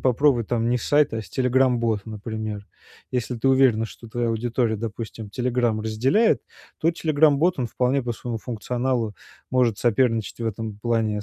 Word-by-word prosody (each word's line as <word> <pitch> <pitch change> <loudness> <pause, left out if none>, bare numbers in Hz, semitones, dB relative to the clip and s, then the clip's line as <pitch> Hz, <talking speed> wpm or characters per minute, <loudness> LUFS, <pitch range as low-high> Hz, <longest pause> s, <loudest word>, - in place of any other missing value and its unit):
попробовать 130 -2 +2
там 115 -1 0
не 125 - +2
сайт, 145 +1 +2
а 110 - -2
с - - -15
Telegram-бот, 125 -5 +2
например. 110 -1 -5 0.5
Если 125 -1 -2
ты 135 - +1
уверена, 130 -4 +4
что 115 +1 -12
твоя 120 +1 -1
аудитория, 115 0 0
допустим, 110 0 -6
"Телеграм" 120 -1 0
разделяет, 125 - +2 0.4
то 160 - +1
Telegram-бот- 155 0 +3
он 125 - 0
вполне 130 +4 +1
по 120 0 -2
своему 115 0 -5
функционалу 120 0 -2 0.4
может 120 -4 +2
соперничать 115 -2 +1
в 115 - -2
этом 110 -1 -4
плане 110 -3 0
120 Hz, 155 wpm, -24 LUFS, 110-130 Hz, 0.5 s, уверена